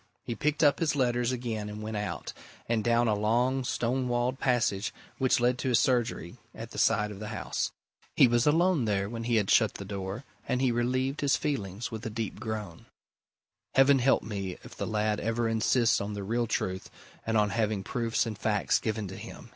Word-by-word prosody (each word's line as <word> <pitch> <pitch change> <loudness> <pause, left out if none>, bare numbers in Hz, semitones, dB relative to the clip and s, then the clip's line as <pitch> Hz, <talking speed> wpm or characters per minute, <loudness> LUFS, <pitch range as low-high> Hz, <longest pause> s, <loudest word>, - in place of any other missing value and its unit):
He 120 - -2
picked 150 +7 0
up 145 -1 +5
his 160 -3 +1
letters 120 -2 +1
again 115 -4 -3
and 105 0 -7
went 110 0 -4
out, 105 -4 -4 0.3
and 115 -2 +1
down 120 +1 +3
a 110 - +3
long 120 +6 +1
stone 125 +1 -1
walled 120 +2 0
passage 115 -5 +1 0.3
which 130 -2 +3
led 125 +1 +2
to 130 - -1
his 120 - +4
surgery 120 -6 0 0.2
at 115 0 -8
the - - -5
side 105 -1 +2
of 100 - -9
the 105 - -6
house. - - -3 0.4
He 130 - +7
was 120 +1 +2
alone 165 -2 +3
there 100 -2 0
when 115 +1 -5
he 120 0 +1
had 105 -3 +2
shut 110 -3 +4
the 100 - -6
door 100 +4 -5 0.2
and 125 - 0
he 130 -2 +2
relieved 130 +4 0
his 140 -2 +3
feelings 115 - -3
with 110 -1 -6
a 115 - -3
deep 110 -2 -4
groan. 105 -7 -6 0.9
"Heaven 135 +1 +6
help 135 +2 +3
me 100 -4 -4
if - - -12
the - - -3
lad 105 -1 0
ever 115 +1 0
insists 115 +1 +2
on 100 +1 -4
the 100 -1 -4
real 115 +4 0
truth 95 -3 -2 0.3
and 115 0 0
on 105 -1 +2
having 110 -3 0
proofs 115 +3 0
and 110 -2 -4
facts 105 0 +1
given 110 -2 -2
to 95 - -8
him!" - - -10
115 Hz, 205 wpm, -29 LUFS, 105-125 Hz, 0.9 s, He